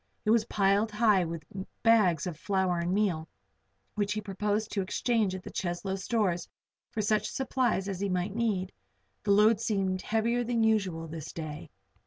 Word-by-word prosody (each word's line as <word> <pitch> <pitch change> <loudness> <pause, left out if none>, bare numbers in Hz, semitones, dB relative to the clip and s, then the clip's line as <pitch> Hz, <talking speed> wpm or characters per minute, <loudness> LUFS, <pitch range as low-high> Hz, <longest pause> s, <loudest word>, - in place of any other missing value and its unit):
It 215 - +3
was 225 -1 +4
piled 200 +1 +2
high 210 -3 +3
with 165 -2 -6 0.4
bags 210 -9 +4
of 175 -3 -4
flour 190 0 0
and 170 +1 -1
meal, 185 -6 +1 0.7
which 205 -1 0
he 215 - -2
proposed 210 +2 -2
to 200 - 0
exchange 210 0 0
at 185 - -7
the - - -8
Cheslow 185 +2 -2
stores 190 -3 -1 0.4
for 220 -3 -2
such 215 0 +1
supplies 250 -6 0
as 195 -2 -3
he 200 0 -1
might 185 +2 -1
need. 205 -5 -1 0.5
The 210 - -5
load 210 +2 +5
seemed 190 -4 0
heavier 230 +2 0
than 235 -1 +1
usual 195 -7 +1
this 155 -1 -7
day. 155 -2 -7
200 Hz, 170 wpm, -29 LUFS, 180-220 Hz, 0.7 s, load